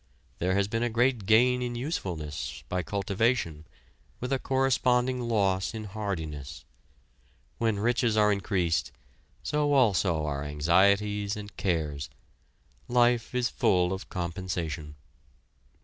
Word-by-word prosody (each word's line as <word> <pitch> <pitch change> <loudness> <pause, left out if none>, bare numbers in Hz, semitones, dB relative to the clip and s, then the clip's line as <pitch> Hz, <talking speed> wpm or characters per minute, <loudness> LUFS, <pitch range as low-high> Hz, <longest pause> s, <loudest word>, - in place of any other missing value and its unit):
There 95 +2 +1
has 100 0 +2
been 115 +2 -2
a 120 - +1
great 120 -2 +1
gain 125 +3 +4
in 120 -1 -3
usefulness, 90 - -4
by 90 0 0
cultivation, 100 -5 -1 0.5
with 125 +2 -2
a 135 - +1
corresponding 130 -1 +1
loss 100 -4 0
in 110 - -5
hardiness. 80 - -5 0.9
When 115 -3 +1
riches 115 +1 +1
are 105 -1 +5
increased, 95 -4 0 0.5
so 150 -1 +1
also 95 - +3
are 70 -1 -2
anxieties 100 +7 +2
and 105 -3 -9
cares. 75 -7 -2 0.8
Life 120 0 +2
is 125 -1 +1
full 90 0 +2
of 95 - -7
compensation. 85 -4 -4
100 Hz, 115 wpm, -28 LUFS, 85-120 Hz, 0.9 s, are